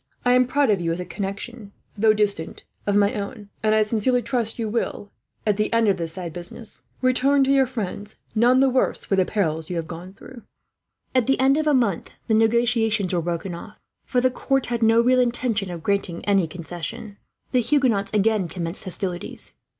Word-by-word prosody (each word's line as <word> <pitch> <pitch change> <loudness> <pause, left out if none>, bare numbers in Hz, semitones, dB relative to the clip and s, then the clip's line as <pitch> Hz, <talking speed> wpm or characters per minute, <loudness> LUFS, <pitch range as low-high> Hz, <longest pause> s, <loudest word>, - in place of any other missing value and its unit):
I 245 - +4
am 250 0 +5
proud 275 -1 +2
of 195 -3 +1
you 165 -1 0
as 165 - -2
a 180 - -4
connection, 200 +4 -6 0.2
though 215 +1 +4
distant, 205 -6 -1 0.2
of 205 - +2
my 205 0 +3
own; 205 0 -6
and 215 0 +3
I 215 - +4
sincerely 230 +3 +1
trust 235 -1 -1
you 225 -2 -2
will, 210 -2 -3 0.3
at 210 -2 +2
the 215 - 0
end 230 -1 +3
of 195 - +2
this 165 -2 -4
sad 170 -2 -6
business, 175 +6 -7 0.2
return 255 +2 +3
home 275 - +5
to 270 - +2
your 270 -1 +4
friends 210 -3 -5 0.2
none 245 +4 +4
the 270 - +5
worse 255 - +1
for 195 - +1
the 190 -1 +3
perils 160 -7 -1
you 180 - -3
have 165 -1 -2
gone 175 +3 -8
through." 250 +1 -12 0.7
At 255 -3 +2
the 270 - +2
end 265 +1 +4
of 310 0 0
a 295 - +4
month 220 -9 0
the 225 - 0
negotiations 225 -3 +2
were 175 - +1
broken 170 +2 -3
off, 170 - -10 0.3
for 250 - 0
the 255 +1 +2
court 270 +1 0
had 240 -1 -2
no 225 0 +5
real 255 +2 +3
intention 240 -5 0
of 170 -2 -7
granting 200 -3 -1
any 195 -4 +3
concessions. 175 +5 -7 0.3
The 250 - +3
Huguenots 235 -6 +2
again 215 -2 +2
commenced 170 +1 -5
hostilities. 180 -1 -5
215 Hz, 205 wpm, -23 LUFS, 185-245 Hz, 0.7 s, am